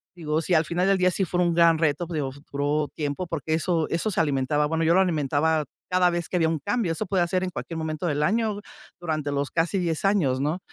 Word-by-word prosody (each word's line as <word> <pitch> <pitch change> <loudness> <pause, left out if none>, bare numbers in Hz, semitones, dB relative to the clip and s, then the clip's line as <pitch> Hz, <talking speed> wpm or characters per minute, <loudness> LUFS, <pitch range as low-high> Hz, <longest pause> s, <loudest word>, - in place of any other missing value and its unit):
Digo, 155 -2 -1
si 180 - -1
al 160 -1 +4
final 175 +4 0
del 195 0 +3
día 185 0 +3
sí 190 +2 0
fue 180 +1 -1
un 175 -1 +2
gran 165 -1 +5
reto, 160 +1 0
pues, 165 -2 -4
digo 135 -3 -2 0.2
duró 145 +1 0
tiempo, 150 +4 -3
porque 160 -1 -2
eso 165 -1 0
eso 170 +6 0
se 185 - +2
alimentaba. 145 0 +1
Bueno, 160 +1 -1
yo 165 - +4
lo 190 - +5
alimentaba 155 -2 +1 0.2
cada 180 0 +3
vez 170 -1 -3
que 180 - 0
había 165 -2 +3
un 160 -1 -1
cambio. 195 - -1
Eso 215 - -3
podía 180 -2 +1
ser 185 +2 0
en 185 - -1
cualquier 170 -2 -6
momento 160 +1 -3
del 150 -2 0
año 215 +3 0 0.4
durante 155 -4 -2
los 140 0 -2
casi 170 +4 0
10 170 0 -1
años 165 -11 +2
¿no? 150 +6 -1
165 Hz, 245 wpm, -25 LUFS, 150-180 Hz, 0.4 s, gran